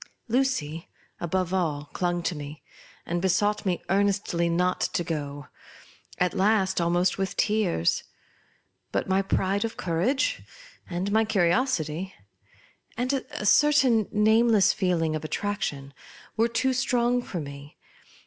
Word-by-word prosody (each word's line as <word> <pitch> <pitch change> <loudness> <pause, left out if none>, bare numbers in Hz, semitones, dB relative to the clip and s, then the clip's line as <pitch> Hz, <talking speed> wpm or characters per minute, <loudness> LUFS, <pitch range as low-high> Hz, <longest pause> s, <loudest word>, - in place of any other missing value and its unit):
Lu 250 +4 +3
cy, 165 - -3 0.3
above 185 +1 -1
all, 150 -6 -1
clung 175 -1 -1
to 175 - -1
me, 150 0 -8 0.4
and 175 0 -2
besought 205 +3 +2
fne 180 -2 0
earnestly 195 -3 +1
not 180 +2 +1
to 175 - 0
go 145 -3 -4 0.4
— - - -24 0.3
at 180 0 +1
last, 190 -2 +2
almost 175 +2 +1
with 195 0 -2
tears. 205 - +1 0.9
But - - -1
my 190 +1 +2
pride 195 +1 0
of 230 - -4
courage, 255 - 0 0.5
and 185 +3 -2
my 220 +1 +4
curiosity, 190 - 0 0.8
and 250 +3 0
a 260 -5 -4
certain 255 -2 +4
nameless 220 0 +4
feeling 175 -6 0
of 155 - -4
attraction, 155 -5 -3 0.4
were 225 +1 +3
too 235 +3 0
strong 245 -1 +1
for 185 -7 -5
me. 140 0 -9
190 Hz, 130 wpm, -26 LUFS, 170-220 Hz, 0.9 s, my